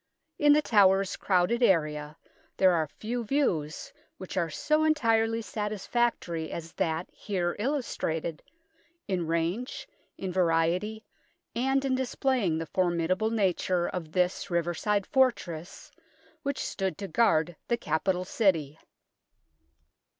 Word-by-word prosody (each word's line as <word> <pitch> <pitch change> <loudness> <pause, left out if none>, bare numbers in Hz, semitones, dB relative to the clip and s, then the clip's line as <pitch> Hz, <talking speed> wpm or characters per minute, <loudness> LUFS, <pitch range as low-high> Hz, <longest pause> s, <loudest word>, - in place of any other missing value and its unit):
In 295 -1 +6
The 300 +1 +3
Towers 195 -4 +4
crowded 190 +5 +1
area 150 -7 +1 0.4
there 190 -1 +5
are 160 -2 +1
few 235 - -4
views 180 - -1 0.2
which 185 - -8
are 170 -3 0
so 305 - +1
entirely 230 -7 +2
satisfactory 210 -4 -2
as 165 -1 -6
that 160 +1 -1
here 180 -4 -2
illustrated, 205 - -2 0.7
in 180 -5 -1
range, 170 - -2 0.3
in 190 -1 -4
variety, 180 +5 +1 0.5
and 270 +3 +1
in 265 - +1
displaying 255 - 0
the 165 - -3
formidable 180 +4 0
nature 185 -4 +1
of 165 -4 -5
this 180 +2 0
riverside 175 +4 0
fortress, 195 -10 0 0.5
which 280 -2 -2
stood 190 -1 -2
to 200 -1 -5
guard 165 -4 +2
the 235 - +1
capital 180 0 -1
City. 165 - +1
190 Hz, 115 wpm, -28 LUFS, 165-230 Hz, 0.7 s, In